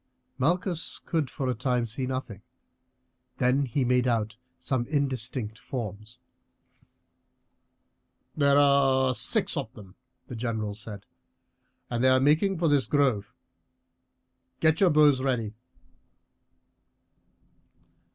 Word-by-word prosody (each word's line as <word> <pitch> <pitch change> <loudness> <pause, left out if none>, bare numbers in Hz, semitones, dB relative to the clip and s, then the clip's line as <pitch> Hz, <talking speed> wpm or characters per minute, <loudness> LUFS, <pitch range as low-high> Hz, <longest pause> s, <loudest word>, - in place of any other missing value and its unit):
Malchus 175 +4 0
could 160 -6 -1
for 135 - -4
a 125 - +1
time 125 0 -1
see 125 +3 -4
nothing; 130 -6 -5 1.0
then 130 +3 +2
he 130 +2 -1
made 125 0 +2
out 110 -3 -1 0.2
some 125 -3 -2
indistinct 125 -6 -2
forms. 110 -2 -6 2.2
"There 140 -1 +3
are 135 -2 +4
six - - +2
of - - -4
them," 95 -3 -14 0.3
the 125 - -8
general 110 -3 -3
said, 105 -1 -9 0.9
"and 120 0 -1
they 130 - +5
are 130 0 +4
making 155 +8 +2
for 165 0 +1
this 145 -3 +2
grove. 130 -8 +1 1.3
Get 160 +2 +2
your 190 - +6
bows 150 -4 +4
ready." 120 -5 -1
130 Hz, 110 wpm, -27 LUFS, 115-145 Hz, 2.2 s, your